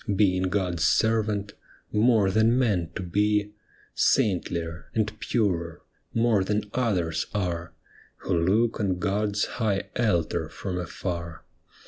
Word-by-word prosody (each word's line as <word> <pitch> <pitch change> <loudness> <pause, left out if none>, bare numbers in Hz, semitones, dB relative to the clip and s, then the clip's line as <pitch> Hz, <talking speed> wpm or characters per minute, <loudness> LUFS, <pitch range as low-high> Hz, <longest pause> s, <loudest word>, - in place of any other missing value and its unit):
Being 95 -2 +2
God's 90 -4 -1
servant, 105 +2 +1 0.4
more 105 -3 +3
than 110 +4 +3
man 100 -10 +1
to - - -4
be, 105 +3 +1 0.4
Saintlier, 85 -3 0
and 105 -1 0
purer, 90 -7 -1 0.3
more 115 -4 +2
than 105 +1 -2
others 95 -10 0
are. 85 -4 -2 0.5
Who 95 - 0
look 105 +8 +2
on 95 -4 0
God's 105 +2 0
high 105 -5 -2
altar 105 -9 0
from 90 -2 -4
afar. 85 -2 -5
100 Hz, 115 wpm, -26 LUFS, 90-105 Hz, 0.5 s, more